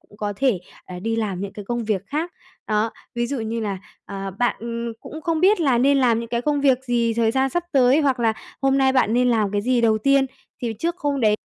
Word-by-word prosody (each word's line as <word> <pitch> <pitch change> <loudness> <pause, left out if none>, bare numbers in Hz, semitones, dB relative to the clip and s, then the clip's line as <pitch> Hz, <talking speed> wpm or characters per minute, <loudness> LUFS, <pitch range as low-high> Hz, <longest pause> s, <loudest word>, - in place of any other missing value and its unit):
cũng 205 - -21
có 205 -1 -3
thể, 255 -5 +2 0.3
à, 180 -1 -8
đi 225 +4 -2
làm 200 -5 -2
những 200 0 -5
cái 205 - -8
công 240 +2 -2
việc 210 -3 -1
khác. 315 - -3 0.3
Đó, 215 +1 +1 0.2
ví 240 0 0
dụ 270 +1 -3
như 225 +1 -3
là, 200 -3 -3 0.3
ờ, 195 0 -5
bạn, 245 -1 +1
ừm, 235 0 -4
cũng 310 - -9
không 320 0 -1
biết 385 +1 +4
là 270 -6 +3
nên 275 +3 +4
làm 235 -3 +3
những 230 - -6
cái 235 0 -1
công 290 +1 +1
việc 265 -2 +2
gì, 235 -2 +1
thời 225 -1 +2
gian 265 +2 +1
sắp 350 +3 -1
tới 265 +1 +5
hoặc 270 -4 +1
là 225 -1 +3 0.3
hôm 270 0 +3
nay 265 -1 +3
bạn 255 -4 +2
nên 250 +1 +3
làm 220 -4 +2
cái 205 - +1
gì 245 +1 +2
đầu 220 -2 +3
tiên 275 +4 +3 0.4
thì 235 -2 -1
trước 340 +5 -1
hôm 285 -5 -1
đấy, 210 -2 +3
240 Hz, 255 wpm, -22 LUFS, 220-270 Hz, 0.4 s, tới